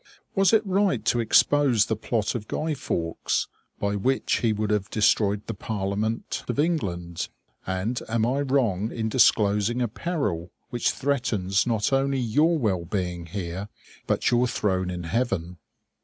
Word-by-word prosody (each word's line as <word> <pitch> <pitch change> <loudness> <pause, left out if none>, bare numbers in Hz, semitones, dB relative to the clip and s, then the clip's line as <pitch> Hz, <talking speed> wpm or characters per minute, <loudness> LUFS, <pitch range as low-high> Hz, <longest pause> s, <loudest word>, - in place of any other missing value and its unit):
Was 195 -2 +4
it 220 -1 +4
right 190 - +1
to 120 - +2
expose 120 0 +4
the 110 - -1
plot 110 0 -1
of 110 -3 -5
Guy 155 0 -1
Fawkes, 85 - -2 0.3
by 100 0 0
which 130 +7 +1
he 115 - +2
would 105 0 -1
have 105 -1 0
destroyed 105 -2 +2
the - - -4
Parliament 105 +2 -3
of 120 - -2
England? 90 - -1 0.4
And 95 +6 -2
am 110 0 +1
I 135 +4 +1
wrong 120 -7 +1
in 110 -1 -2
disclosing 105 -1 +3
a 120 - +1
peril 105 - -3 0.2
which 120 - +1
threatens 120 -8 0
not 115 +1 +1
only 135 0 +2
your 150 +8 +2
well 100 - 0
being 90 -2 -3
here, 95 +2 -5 0.4
but - - +1
your 120 +1 +3
throne 95 -5 0
in 90 -1 -4
heaven? 90 -3 -2
110 Hz, 155 wpm, -25 LUFS, 95-130 Hz, 0.4 s, Was